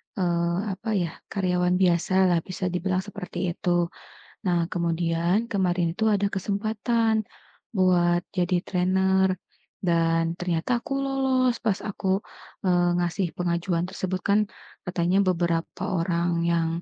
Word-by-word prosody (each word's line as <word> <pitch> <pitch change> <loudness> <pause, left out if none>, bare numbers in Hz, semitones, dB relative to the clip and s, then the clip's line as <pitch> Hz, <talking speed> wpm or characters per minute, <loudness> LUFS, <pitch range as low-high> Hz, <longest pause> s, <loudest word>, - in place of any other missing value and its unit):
eee, 170 -2 0
apa 210 +4 -5
ya, 175 -4 0 0.2
karyawan 180 -2 +1
biasalah 180 0 +3
bisa 185 -1 -3
dibilang 185 +1 -1
seperti 180 -2 -4
itu. 175 0 0 0.6
Nah, 170 -1 +1
kemudian 170 +5 0
kemarin 180 -3 +1
itu 220 - +2
ada 205 -2 +2
kesempatan 220 +3 0 0.5
buat 175 -2 +3
jadi 180 -1 0
trainer 190 +1 +2 0.5
dan 165 -1 +1
ternyata 180 +7 0
aku - - -6
lolos 265 -2 +1
pas 210 -4 +1
aku, 195 -1 -1 0.5
eee, 175 -1 +3
ngasih 175 +2 0
pengajuan 170 0 0
tersebut 185 0 -3
kan 200 +1 +3 0.5
katanya 180 +1 +1
beberapa 170 -2 0 0.2
orang 170 0 0
yang, 170 -1 +2
180 Hz, 120 wpm, -25 LUFS, 170-195 Hz, 0.6 s, biasalah